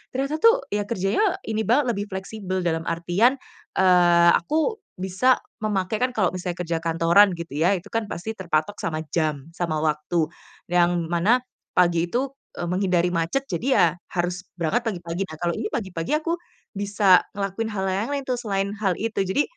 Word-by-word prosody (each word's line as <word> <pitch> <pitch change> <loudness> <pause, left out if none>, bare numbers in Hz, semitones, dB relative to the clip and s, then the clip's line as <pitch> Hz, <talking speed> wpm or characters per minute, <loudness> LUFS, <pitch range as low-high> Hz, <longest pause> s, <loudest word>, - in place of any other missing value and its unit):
ternyata 275 +4 -1
tuh 465 +2 +5
ya 205 0 -1
kerjanya 235 - +1
ini 220 0 -2
banget 250 +2 +3
lebih 205 -2 -3
fleksibel. 190 -1 -4
Dalam 165 -1 -1
artian, 175 +10 +2 0.4
eee, 175 -2 +5
aku 320 - 0 0.2
bisa 190 +8 +3 0.3
memakai, 200 -1 0
kan 255 0 +2
kalo 190 -5 +2
misalnya 180 -1 -4
kerja 165 -1 -1
kantoran 170 +5 +4
gitu 170 -3 -7
ya 165 +5 +3
itu 180 - -7
kan 225 0 0
pasti 205 +3 -5
terpatok 175 0 -1
sama 155 -1 -2
jam, 155 -4 -1
sama 165 -3 -1
waktu, 155 +1 0 0.4
yang 175 -1 +2
mana 210 +9 +3 0.3
pagi 175 -1 +3
itu, 260 +6 -1 0.3
eee, 175 - -2
menghindari 180 -1 +2
macet 170 +11 -1
jadi 180 +9 -2
ya - - +6 0.3
harus 175 +1 -1 0.2
berangkat 225 +9 0
pagi-pagi. 175 0 -4
Nah 160 - -9
kalau 170 -1 +1
ini - - -2
pagi-pagi 185 - -2
aku 330 +2 -1 0.4
bisa 200 -2 +4
ngelakuin 200 +3 -3
hal 195 -2 -2
yang 190 - 0 0.2
lain-lain 280 -1 -3
tuh 250 - +1
selain 200 -4 -1
hal 200 -3 +1
itu. 220 -2 -1
Jadi, 190 +10 +2
190 Hz, 170 wpm, -24 LUFS, 170-220 Hz, 0.4 s, ya